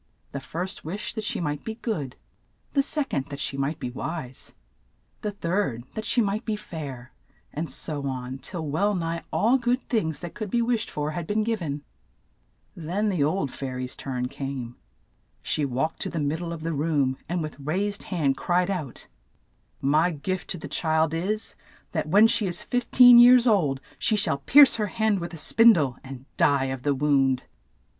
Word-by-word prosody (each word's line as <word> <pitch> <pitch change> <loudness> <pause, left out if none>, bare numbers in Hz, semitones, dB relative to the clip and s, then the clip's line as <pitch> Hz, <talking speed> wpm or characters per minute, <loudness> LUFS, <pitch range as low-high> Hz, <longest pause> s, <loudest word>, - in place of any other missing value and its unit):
The 140 - -4
first 180 +7 -5
wished 190 +5 -5
that 220 - -4
she - - -2
might 150 -3 -3
be 220 - -5
good: 170 - -4 0.6
the 280 - +4
sec 290 0 -2
ond, 135 - -1
that 140 -1 -7
she - - -1
might 140 +3 -1
be 125 - -4
wise; 135 0 -6 0.7
the 210 - -2
third, 175 - -2
that 220 - -5
she 240 - +2
might 210 +3 -1
be 220 -2 -2
fair, 145 -11 -8 0.4
and 160 +2 -3
so 145 -3 -2
on, 130 0 -5
till 160 +4 -5
well 200 +8 +1
nigh 165 -1 -2
all 245 +5 +3
good 245 +1 +1
things 160 - -1
that 175 -2 -7
could 215 -3 -5
be 240 - +1
wished 235 -1 0
for 150 0 -3
had 160 +1 -5
been 215 +1 +1
giv 225 -2 -1
en. 145 -3 -4 0.9
Then 180 +6 -1
the 180 -7 +1
old 150 -2 0
fai 135 -2 -5
ry's 125 0 -4
turn 125 -2 -3
came. 135 -3 -6 0.7
She 150 - 0
walked 135 +5 -2
to - - -2
the - - -5
mid 150 +2 -1
die 175 - -5
of 165 -2 -6
the 165 0 -2
room, 145 -3 0
and 175 -1 -1
with 155 -1 -7
raised 195 +8 -1
hand 150 -7 0
cried 180 +5 +1
out, 155 -10 -5 0.8
''My 155 +5 +3
gift 185 +4 -3
to - - -3
the - - -7
child 160 -1 +1
is 200 +6 -2 0.2
— - - -30
that 155 -2 -2
when 205 +6 +7
she 225 -2 +2
is 175 - -2
fif 245 -1 -2
teen 245 -1 +9
years 245 0 +8
old, 165 - +2 0.2
she 220 - +2
shall 195 -8 +1
pierce 275 - +7
her 210 -2 0
hand 220 -1 +1
with 170 0 -6
a - - -9
spin 230 +8 +6
die, 145 -8 0
and 130 -1 -9
die 140 -2 +3
of 130 - -7
the 145 +1 +1
wound." 135 -2 +2
165 Hz, 195 wpm, -25 LUFS, 140-210 Hz, 0.9 s, teen